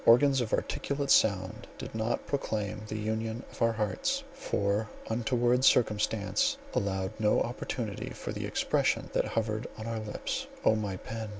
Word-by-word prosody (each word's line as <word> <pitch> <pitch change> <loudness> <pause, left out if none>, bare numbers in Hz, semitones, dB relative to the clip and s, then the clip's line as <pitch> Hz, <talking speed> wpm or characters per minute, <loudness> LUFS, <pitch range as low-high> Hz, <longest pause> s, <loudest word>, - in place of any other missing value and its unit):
Organs 135 +3 +6
of 115 - -2
articulate 140 -1 -1
sound 95 -3 +3
did - - -7
not 110 +1 -1
proclaim 105 -7 -2
the 110 - -3
union 110 +2 -2
of - - -13
our 115 0 +4
hearts; 270 - 0
for 100 +2 0 0.2
untoward 120 +2 +2
circumstance 105 -5 +3 0.2
allowed 95 -1 0
no 105 -1 +4
opportunity 115 -3 -3
for - - -6
the - - -3
expression - - +1
that - - +2
hovered 110 -1 -1
on 110 - -6
our 115 -1 -2
lips. 110 -1 -3 0.2
Oh 110 - +6
my 105 -3 -2
pen! 110 +2 -5
110 Hz, 155 wpm, -30 LUFS, 105-120 Hz, 0.2 s, Organs